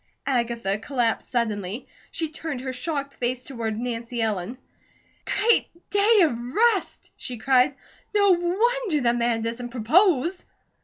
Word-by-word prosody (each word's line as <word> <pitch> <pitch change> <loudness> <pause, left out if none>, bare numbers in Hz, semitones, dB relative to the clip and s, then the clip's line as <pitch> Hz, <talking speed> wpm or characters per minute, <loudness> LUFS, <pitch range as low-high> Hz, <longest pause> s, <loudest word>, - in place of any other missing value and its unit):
Agatha 235 -6 0
collapsed 235 -1 -1
suddenly. 220 -2 -2 0.2
She 320 -2 -3
turned 310 -4 -5
her 260 0 -4
shocked 280 +1 -3
face 250 +1 -2
toward 225 -5 -4
Nancy 235 0 -4
Ellen. 220 +1 -1 0.7
"Great 450 +3 +2 0.2
Day 410 +1 +5
of 305 -8 +2
Rest!" 400 - 0
she 245 - -5
cried. 260 +3 +3 0.4
"No 405 -1 +5
wonder 370 - +1
the 235 -1 +3
man 235 -1 0
doesn't 235 +2 -4
propose!" 320 - +2
255 Hz, 125 wpm, -24 LUFS, 235-340 Hz, 0.7 s, Day